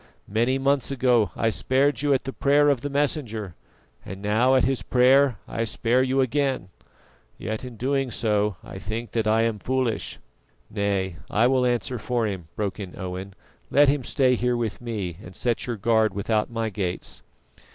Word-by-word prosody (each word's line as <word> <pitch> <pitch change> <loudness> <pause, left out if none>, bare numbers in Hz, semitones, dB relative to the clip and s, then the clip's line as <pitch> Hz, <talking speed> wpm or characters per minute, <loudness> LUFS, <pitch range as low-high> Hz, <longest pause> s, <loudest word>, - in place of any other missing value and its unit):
Many 120 +5 +1
months 135 0 +1
ago 125 -6 +2
I 115 - +1
spared 135 +5 +1
you 145 -1 +1
at 135 - +2
the 135 - -5
prayer 145 +1 +3
of 135 -4 +1
the 145 - -3
Messenger; 135 - -2 0.5
and 95 +1 -8
now 110 +6 +3
at 130 - +4
his 135 0 +1
prayer 130 0 +4
I 115 - -2
spare 115 +2 +1
you 130 +1 +2
again, 135 -6 0 0.7
yet 110 +2 -4
in 125 -3 -8
doing 135 +2 0
so 105 -3 0
I 95 - -9
think 110 +4 -5
that 110 -2 0
I 110 +1 +3
am 115 -2 -1
foolish." 130 0 -1 0.5
"Nay, 100 -4 -1
I 110 +3 +3
will 130 0 +3
answer 120 0 -1
for 120 +1 -1
him," 95 -6 -4
broke 100 -2 -3
in 95 -3 -7
Owen. 95 +1 -6 0.3
"Let 145 +1 +5
him 140 -2 +1
stay 130 +1 +2
here 125 0 +1
with 115 -2 -3
me, 100 -8 -4
and 90 +1 -11
set 120 -1 -1
your 120 -2 -2
guard 110 -1 +2
without 105 +2 0
my 115 -2 -2
gates." 90 -3 -4
115 Hz, 180 wpm, -25 LUFS, 105-130 Hz, 0.7 s, Let